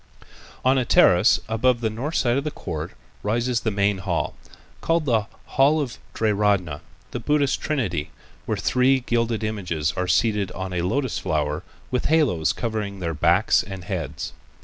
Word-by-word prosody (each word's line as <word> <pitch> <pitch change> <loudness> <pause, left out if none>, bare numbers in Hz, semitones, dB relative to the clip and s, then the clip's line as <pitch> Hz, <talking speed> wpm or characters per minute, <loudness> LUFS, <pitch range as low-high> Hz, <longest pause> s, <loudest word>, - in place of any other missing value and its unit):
On 130 +1 +4
a - - +1
terrace 95 -3 +5
above 120 +2 +2
the 115 -2 0
north 135 +9 -4
side 120 -3 +2
of 140 - 0
the 150 - -1
court 80 - -6 0.3
rises 120 +3 0
the 115 - -1
main 100 -1 +1
hall, 90 -4 -1 0.5
called 165 -1 +1
the 110 -5 +1 0.2
"Hall 140 +4 +3
of 140 -5 -2
the - - -12 0.2
Triratna," 100 -8 +1 0.3
the 120 - -3
Buddhist 145 +2 +1
Trinity, 100 - -1 0.4
where - - 0
three 130 +1 +3
gilded 115 -2 0
images 90 -8 -1
are 90 0 -1
seated 105 -2 +2
on 95 +1 -5
a 90 - 0
lotus 130 +8 -1
flower - - -1 0.3
with 125 -1 -1
halos 145 - +3
covering 110 -4 -3
their 85 -2 -2
backs 75 - +3
and 95 -2 -8
heads. 90 -4 -4
110 Hz, 165 wpm, -23 LUFS, 95-130 Hz, 0.5 s, terrace